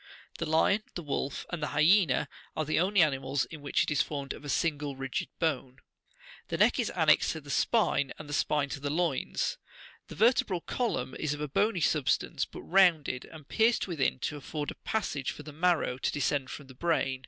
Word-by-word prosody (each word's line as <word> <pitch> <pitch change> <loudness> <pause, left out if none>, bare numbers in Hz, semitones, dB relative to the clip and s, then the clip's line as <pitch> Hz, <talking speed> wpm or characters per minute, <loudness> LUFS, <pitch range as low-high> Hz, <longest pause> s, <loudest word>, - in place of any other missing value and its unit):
The 165 - -2
lion, 160 +6 +3
the 175 - -4
wolf, 140 -1 -3
and 175 -3 -4
the 150 - -3
hyaena 155 -3 +4 0.3
are 155 - 0
the 155 - +1
only 190 0 +4
animals 135 -2 0
in 155 -3 -10
which 145 - +1
it - - -3
is 145 - +3
formed 140 -2 -3
of - - -12
a - - -7
single60 145 -2 -1
rigid 135 -1 -3
bone. 135 -6 -1 0.7
The - - -2
neck - - +4
is - - +1
annexed - - +4
to - - -7
the - - -8
spine, 140 -1 +2
and 155 - -9
the 145 - -6
spine 145 -1 +1
to 140 - -5
the 145 +1 -3
loins, 160 -2 -1 0.5
The - - -9
vertebral 215 -5 +3
column 165 - -2
is 150 -1 -1
of 150 - -8
a 150 - -2
bony 200 +6 +1
substance, 150 -2 +1
but - - -10
rounded, 170 -8 +3
and 155 -3 -13
pierced 225 0 +2
within, 150 -8 0
to 150 - -2
afford 145 +1 -4
a - - -14
passage 145 -11 -2
for 150 - -7
the 150 0 -10
marrow 165 -5 +1
to - - 0
descend 140 -2 0
from 145 - -8
the 130 - -13
brain. 135 -3 0
150 Hz, 205 wpm, -30 LUFS, 140-170 Hz, 0.7 s, hyaena